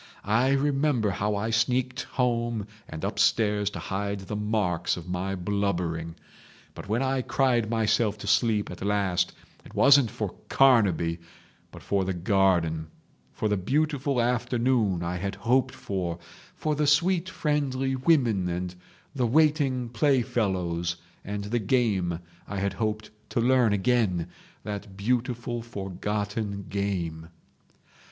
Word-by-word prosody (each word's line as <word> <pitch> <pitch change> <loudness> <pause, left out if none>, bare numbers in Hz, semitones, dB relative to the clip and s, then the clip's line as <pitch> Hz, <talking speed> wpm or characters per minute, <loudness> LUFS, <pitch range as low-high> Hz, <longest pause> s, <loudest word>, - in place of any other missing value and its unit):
I 120 +6 +3
remember 140 -5 +1
how 105 +2 -1
I 110 +3 -1
sneaked 125 +2 +1
home 120 -4 0 0.2
and 80 0 -7
upstairs 105 -2 +2
to - - -8
hide 100 0 -3
the 95 +2 -5
marks 105 -6 0
of 85 - -8
my 90 +2 -2
blubbering. 90 -4 -2 0.6
But - - -10
when 115 +5 +1
I 135 0 +1
cried 120 -3 +1
myself 110 -1 +1
to 105 - -9
sleep 105 0 +2
at - - -7
last 100 -3 +1 0.3
it - - -14
wasn't 140 -4 +6
for - - -4 0.2
Carnaby, 95 -11 +4 0.5
but - - -13
for 100 -1 +1
the 95 0 -2
garden, 85 -4 +2 0.4
for 110 - -2
the 105 -1 +1
beautiful 140 - 0
afternoon 120 -5 +1
I 85 +1 -2
had 100 +2 -3
hoped 120 +6 +1
for, 90 -4 -3 0.4
for 155 - -1
the 150 0 0
sweet 170 +5 +3
friendly 135 -5 -1
women 125 - +2
and 90 +1 -3 0.4
the 130 -4 +1
waiting 140 -2 +2
playfellows 100 - 0 0.3
and 100 0 -4
the 115 +4 -1
game 100 -7 +1 0.3
I 100 - -5
had 100 0 -1
hoped 110 +1 -3 0.2
to - - -1
learn 125 -1 +4
again, 100 -5 +1 0.3
that 100 -1 -6
beautiful 120 +2 -1
forgotten 100 -1 -3
game 85 -5 -3
105 Hz, 130 wpm, -27 LUFS, 95-125 Hz, 0.6 s, wasn't